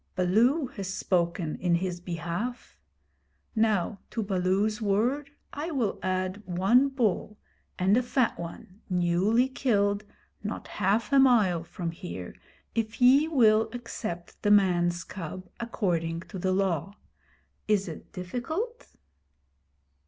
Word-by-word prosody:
Baloo 230 - +3
has 195 -6 -6
spoken 170 -3 0
in 175 -1 +2
his 180 0 -2
behalf. 175 - -4 0.8
Now 215 -3 +1
to 225 - -2
Baloo's 200 +3 0
word 240 +8 +1 0.2
I 300 +4 -3
will 250 - -1
add 185 +1 -1
one 195 +10 +4
bull, 215 -5 -1 0.4
and 190 +3 +3
a 250 - +4
fat 250 0 0
one, 175 +4 -9
newly 185 +7 +2
killed, 205 -6 +1 0.4
not 210 - -5
half 210 +4 0
a 275 - +7
mile 215 -11 +4
from 170 0 -5
here, 165 - -7 0.4
if 225 -1 -2
ye 265 +5 +6
will 225 -7 +4
accept 215 -7 -6
the 205 - +1
man's 175 -4 +3
cub 185 +1 -7
according 170 -8 -1
to 190 - -4
the 185 +1 0
Law. 190 0 0 0.7
Is 205 -3 +2
it 160 - -9
difficult?' 315 - -4
200 Hz, 125 wpm, -28 LUFS, 180-235 Hz, 0.8 s, a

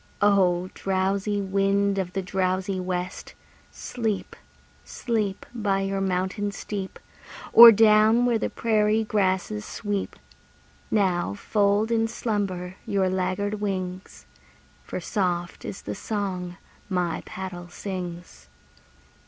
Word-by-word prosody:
O! 185 -3 +3
drowsy 195 +2 -1
wind 195 0 +1
of 180 -1 -3
the 195 - -2
drowsy 185 0 -1
west, 180 0 -4 0.3
Sleep, 220 -5 -4 0.5
sleep, 215 -5 -2
By 200 -4 0
your 195 0 -1
mountain 190 +2 -1
steep, 195 -1 -6 0.6
Or 235 0 +12
down 220 +2 +5
where 235 -2 +2
the - - -1
prairie 215 -1 +1
grasses 185 - 0
sweep! 205 -3 -4 0.7
Now 180 - +1
fold 205 - +1
in 225 -1 +2
slumber 195 -6 -3
your 195 -2 +1
laggard 190 +3 -1
wings, 185 -2 -4 0.6
For - - -5
soft 175 -5 -2
is 105 - -7
the 105 - -4
song 185 - -4 0.3
my 180 -3 -1
paddle 185 -2 -7
sings. 180 -2 -7
195 Hz, 110 wpm, -25 LUFS, 185-210 Hz, 0.7 s, Or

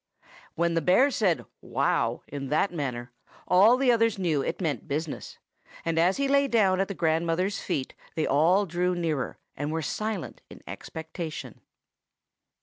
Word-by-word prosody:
When 170 0 +1
the 165 - +1
bear 190 - +4
said 190 -9 +1 0.2
"Wow" - - 0
in 140 -1 -5
that 155 +7 +1
manner, 125 -6 -4 0.4
all 205 +7 +6
the 260 -1 +4
others 230 -2 +2
knew 165 -7 +1
it - - -3
meant 155 - -2
business; 155 +1 -4 0.5
and 165 -1 +1
as 180 +3 +3
he 280 0 +1
lay 280 0 +3
down 200 -7 +3
at 195 - +1
the 200 - -5
grandmother's 170 +4 0
feet, 140 -8 -3 0.2
they 160 - 0
all 170 +8 +3
drew 180 +1 0
nearer, 160 -6 -2 0.2
and 145 +2 -3
were 160 0 -2
silent 215 +2 -4
in - - -13
expectation. 160 0 -7
170 Hz, 155 wpm, -27 LUFS, 155-200 Hz, 0.5 s, all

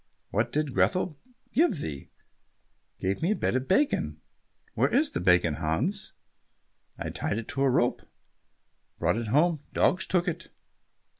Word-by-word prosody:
"What 110 +4 0
did 150 -3 -1
Grethel 110 - +1 0.4
give 275 - +3
thee?" 75 - -6 0.9
"Gave 95 +1 -1
me 175 +6 +2
a - - -3
bit - - 0
of 130 0 -1
bacon." 285 +10 +1 0.5
"Where - - +2
is 295 +2 +3
the - - -2
bacon, 90 -4 +3
Hans?" 115 - -1 0.8
"I - - -4
tied 100 - -2
it 115 - -5
to 135 - 0
a 135 - +4
rope, 120 -1 +1 1.0
brought - - +1
it 115 -1 -3
home, 155 +6 +2
dogs 180 - +2
took 180 -1 +1
it." 170 - -4
135 Hz, 150 wpm, -28 LUFS, -, 1.0 s, a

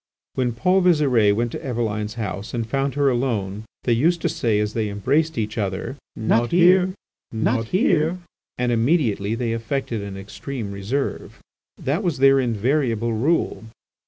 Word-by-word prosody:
When 125 -2 0
Paul 180 +11 +2
Visire 140 - +4
went 120 +1 -1
to - - -6
Eveline's 110 -4 -2
house 100 -1 -4
and 115 -1 -1
found 135 +2 -1
her 145 -1 +2
alone, 110 -5 -2 0.2
they 120 - +2
used 165 +9 +2
to 170 - +2
say, 125 -10 0
as 105 0 -1
they 110 -2 -1
embraced 145 +10 0
each 110 +1 -2
other; 95 +5 -3 0.2
"Not 115 +2 +1
here! 180 +1 +5 0.4
not 115 +1 0
here!" 180 - +2 0.4
and 125 0 0
immediately 115 - +1
they 115 -1 -1
affected 115 0 -3
an 100 -1 -6
extreme 105 +3 -6
reserve. 105 +8 -3 0.4
That 145 +8 -1
was 175 -7 -1
their 135 +1 +5
invariable 120 -1 0
rule. 130 0 0
120 Hz, 155 wpm, -22 LUFS, 110-145 Hz, 0.4 s, here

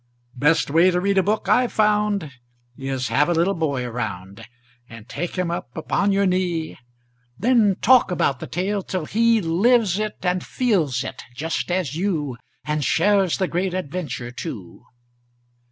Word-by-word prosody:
Best 150 +3 +2
way 165 +4 +5
to 180 -1 +1
read 195 +1 +2
a - - +5
book 205 +1 -1
I've 245 +4 +3
found 210 -6 +1 0.4
Is 135 -1 -3
have 150 - +2
a - - +3
little 175 +4 +2
boy 140 -7 -1
around 110 -3 -6 0.4
And 115 -1 -12
take 175 +7 -5
him 180 -2 -1
up 125 -7 -6
upon 200 +5 0
your 200 0 +2
knee; 180 -4 -1 0.6
Then 220 -2 +3
talk 250 -1 +5
about 140 -7 0
the - - -7
tale, 195 +4 -2
till 185 -3 -4
he 230 +4 +2
Lives 200 +3 +2
it 215 0 -3
and 180 -1 0
feels 170 - 0
it, - - -7
just 160 +7 -3
as 175 -6 -1
you, 160 -8 -2 0.3
And 150 0 -1
shares 195 +3 +2
the 190 - 0
great 180 +1 -2
adventure, 150 -8 -4
too. 120 - -8
175 Hz, 160 wpm, -22 LUFS, 145-200 Hz, 0.6 s, way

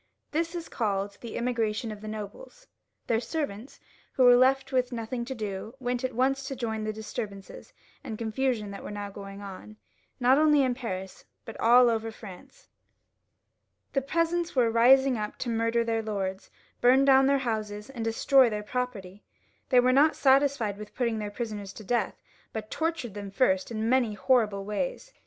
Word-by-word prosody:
This 330 +3 -1
is 335 -1 -5
called 200 -3 -2
the 235 - -6
Emigration 230 -2 -1
of 210 -1 -9
the 215 - -8
Nobles. 220 - -8 0.4
Their 225 -1 +1
servants, 255 -4 -5 0.3
who 260 - +3
were 245 -1 +8
left 265 +2 +3
with 255 -1 +1
nothing 235 +1 -4
to 265 +1 -5
do, 215 +1 -5
went 245 0 -2
at 255 -2 -2
once 270 +2 +1
to 270 - -4
join 230 -3 -3
in 215 - -4
the 215 - -1
disturbances 210 -2 -7 0.3
and 225 -6 -6
confusion 225 -2 -1
that 200 - -8
were - - -6
now 205 -1 -5
going 200 0 -9
on, 200 +2 -10 0.4
not 255 +3 +4
only 300 -2 +5
in 255 -1 +1
Paris, 190 -7 -6 0.2
but 225 - -8
all 245 +2 +6
over 225 -1 0
France. 215 - -13 1.3
The 275 - +2
peasants 335 +4 -1
were 240 -3 +3
rising 255 +2 +5
up 210 0 -4
to 245 - -4
murder 230 +1 +1
their 225 -1 -1
lords, 195 -3 -4 0.3
bum 260 +3 +5
down 270 -1 +6
their 280 0 +4
houses, 215 -4 -3
and 240 -4 -5
destroy 245 +3 +4
their 210 -1 -4
property. 210 -5 -4 0.5
They 255 - +6
were 255 +1 +3
not 295 +4 +5
satisfied 265 -7 +2
with 210 0 -10
putting 235 -3 0
their 210 -1 -3
prisoners 205 -2 -5
to 215 - -10
death, 240 +3 -1 0.3
but 215 -1 -6
tortured 320 - -2
them 200 -1 -6
first 190 -3 +1
in 220 -1 -2
many 240 -3 +2
horrible 210 -5 +1
ways. - - -4
230 Hz, 180 wpm, -28 LUFS, 210-265 Hz, 1.3 s, were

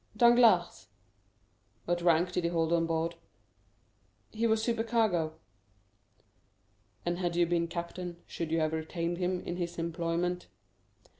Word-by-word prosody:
"Danglars." 220 - +5 1.0
"What 175 0 0
rank 175 +1 +3
did 180 - -1
he 170 - +1
hold 165 -1 +1
on 165 -1 +2
board?" 165 +1 -1 1.2
"He 225 +1 0
was 220 0 +2
supercargo." 225 -8 +1 1.7
"And 175 0 -1
had 175 -2 -1
you 175 0 +4
been 170 0 0
captain, 170 +1 -5
should 165 -2 -5
you 165 - +2
have 155 0 0
retained 170 +2 -3
him 180 0 -1
in 175 - -4
his 175 -1 -4
employment?" 170 +1 -2
175 Hz, 130 wpm, -30 LUFS, 165-180 Hz, 1.7 s, Danglars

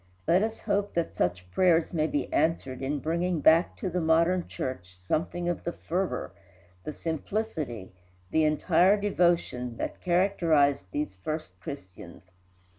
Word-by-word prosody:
Let 180 +3 +4
us 220 +1 -2
hope 200 0 -1
that 170 -1 -1
such 90 +1 -1
prayers 170 - +3
may 155 -2 +1
be 145 - -2
answered 145 -5 0
in 140 +2 -1
bringing 170 +3 -1
back 160 +4 +4
to - - -3
the 180 +1 -1
modern 165 +3 +2
church 95 -8 -6
something 170 - -2
of 175 - -2
the 170 - -2
fervor, 180 - -3 0.5
the - - -4
simplicity, 160 - -4 0.4
the 160 - +3
entire 170 +6 +3
devotion 170 - +1
that - - -4
characterized 170 - +2
these 145 -2 -3
first 95 - -6
Christians. 90 - -10
160 Hz, 140 wpm, -28 LUFS, 130-175 Hz, 0.5 s, Let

